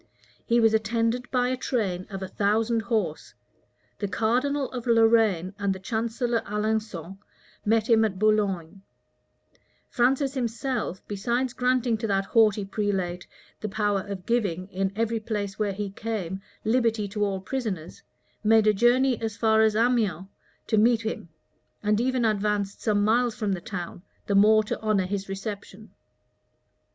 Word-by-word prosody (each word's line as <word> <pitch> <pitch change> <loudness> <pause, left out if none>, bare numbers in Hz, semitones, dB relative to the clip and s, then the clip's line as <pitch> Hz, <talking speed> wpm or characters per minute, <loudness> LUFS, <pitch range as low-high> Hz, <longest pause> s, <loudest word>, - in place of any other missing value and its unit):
He 235 +1 +3
was 225 -1 +4
attended 230 +3 0
by 250 -1 +1
a 255 - 0
train 200 -8 -2
of 195 -2 -6
a - - -4
thousand 220 +4 +1
horse. 215 -9 -2 0.6
The 205 - -1
cardinal 255 +7 0
of 250 -1 -6
Lorraine, 225 -6 +3
and 200 -1 0
the - - -8
chancellor 230 +3 -1
Alençon, 210 -4 -3 0.5
met 220 +1 +2
him 225 -2 +5
at 205 -4 -1
Boulogne; 195 -4 0 1.1
Francis 270 +2 +2
himself, 245 -5 -3
besides 240 +5 -1
granting 250 -2 +1
to 225 - -2
that 195 -1 +1
haughty 215 -3 +3
prelate 195 -3 -2 0.3
the 215 - -4
power 205 -1 0
of 195 -2 -7
giving, 200 -7 0
in 190 0 -1
every 230 +1 0
place 210 -2 -4
where 210 -2 +1
he 200 0 -4
came, 195 -3 -4 0.2
liberty 225 -2 +1
to 210 +1 -2
all 195 -2 -1
prisoners, 190 -6 -4 0.4
made 220 0 +5
a 215 - +5
journey 245 +4 +3
as 220 -2 -3
far 220 -1 +3
as 220 -1 +3
Amiens 220 -7 +1 0.4
to 220 - +2
meet 230 +1 +3
him, 220 -6 -4 0.5
and 210 +1 +2
even 255 -1 +1
advanced 210 -2 0
some 205 -2 +1
miles 235 +2 +2
from 210 -4 -2
the 185 -2 -2
town, 175 -2 -6 0.2
the 200 - -1
more 215 +2 +6
to 210 - -4
honor 215 -4 +1
his 195 +1 -4
reception. 200 +1 -7
215 Hz, 150 wpm, -26 LUFS, 195-230 Hz, 1.1 s, more